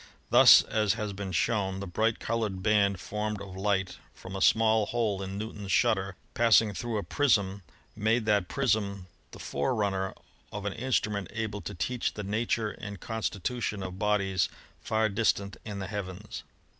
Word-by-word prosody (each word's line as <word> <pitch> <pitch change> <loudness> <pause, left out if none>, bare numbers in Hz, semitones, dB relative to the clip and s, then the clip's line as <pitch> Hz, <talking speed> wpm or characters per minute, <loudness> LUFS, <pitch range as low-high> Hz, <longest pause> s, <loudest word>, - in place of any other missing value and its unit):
Thus, - - +9
as 105 -2 +1
has 105 -2 -3
been 95 -1 -5
shown, 95 +1 0
the 100 - -4
bright 110 +5 0
colored 105 -5 -2
band 100 -3 +3
formed 105 +1 -3
of 95 -2 -9
light 95 -1 -1 0.2
from 95 +1 -9
a 95 - -4
small 110 -1 +4
hole 110 -5 -1
in 95 0 -5
Newton's 105 -2 -5
shut - - +4
ter 95 -1 -5 0.2
passing 115 -2 +4
through 115 +2 -3
a 100 - -2
prism 100 -9 +1 0.3
made 110 +2 +1
that 105 -4 +2
prism 100 -8 0 0.2
the - - -12
forerun 100 - -1
ner 95 0 -3 0.4
of 105 -1 -6
an 100 - -1
instrument 105 -5 -1
able 110 -2 -3
to 100 - -6
teach 120 +7 -2
the 105 - -4
nature 110 +1 -1
and 100 -2 -8
constitu 110 +1 -3
tion 100 -2 -2
of 95 0 -6
bodies 100 -3 +1 0.3
far 110 0 +1
distant 100 -1 0
in 105 -2 -6
the 95 - -4
heavens. 100 0 -6
105 Hz, 170 wpm, -29 LUFS, 95-110 Hz, 0.4 s, Thus